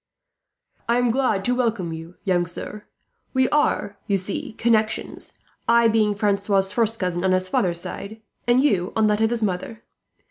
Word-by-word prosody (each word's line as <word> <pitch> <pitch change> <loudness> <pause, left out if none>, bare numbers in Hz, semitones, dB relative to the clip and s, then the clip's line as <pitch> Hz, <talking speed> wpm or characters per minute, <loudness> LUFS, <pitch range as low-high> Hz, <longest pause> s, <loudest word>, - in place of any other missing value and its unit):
"I 235 - +4
am 245 -1 +2
glad 230 -6 +1
to 245 - +2
welcome 225 -9 -1
you, 165 +2 -9
young 180 -3 +1
sir. 205 +4 -7 0.5
We 260 0 +4
are, 250 -8 +1
you 200 - +2
see, 195 +3 -4
connections; 220 -1 0 0.4
I 235 0 +5
being 215 -2 +2
Philip's 200 -1 +1
first 225 -1 0
cousin 180 -1 -1
on 190 -1 +3
his 185 0 +1
father's 175 -2 0
side, 210 +5 -7 0.3
and 240 +1 +5
you 200 -10 +1
on 220 - +3
that 210 0 +2
of 220 - +3
his 235 -1 -1
mother. 205 +3 -3
210 Hz, 170 wpm, -23 LUFS, 185-230 Hz, 0.5 s, I